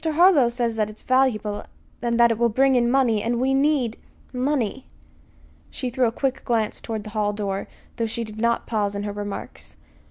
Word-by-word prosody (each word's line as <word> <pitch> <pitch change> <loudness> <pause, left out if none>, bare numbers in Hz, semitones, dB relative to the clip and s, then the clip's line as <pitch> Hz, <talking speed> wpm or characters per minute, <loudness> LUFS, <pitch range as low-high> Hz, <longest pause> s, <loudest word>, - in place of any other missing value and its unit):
Harlow 320 -5 +5
says 235 -2 -1
that 215 -1 +1
it 215 - -10
is - - -11
valuable, 230 -6 +1 0.4
and 235 -1 0
that 235 0 +6
it 225 - -2
will 235 0 +3
bring 265 +4 +3
in 240 -1 +3
money; 245 -5 +3
and 235 +2 -1
we 265 +2 +2
need 270 -5 +1 0.4
money." 260 -1 -1 0.8
She 255 -3 -4
threw 255 0 +2
a - - -1
quick 265 +2 -2
glance 225 -3 -1
toward 220 -2 -4
the 215 - -9
hall 210 -1 0
door, 200 -2 -3 0.3
though 230 - 0
she 230 +1 -3
did 215 -1 -8
not 235 +1 +1
pause 205 -3 -1
in 200 - -3
her 205 0 -3
remarks. 205 -1 -7
235 Hz, 200 wpm, -23 LUFS, 215-260 Hz, 0.8 s, that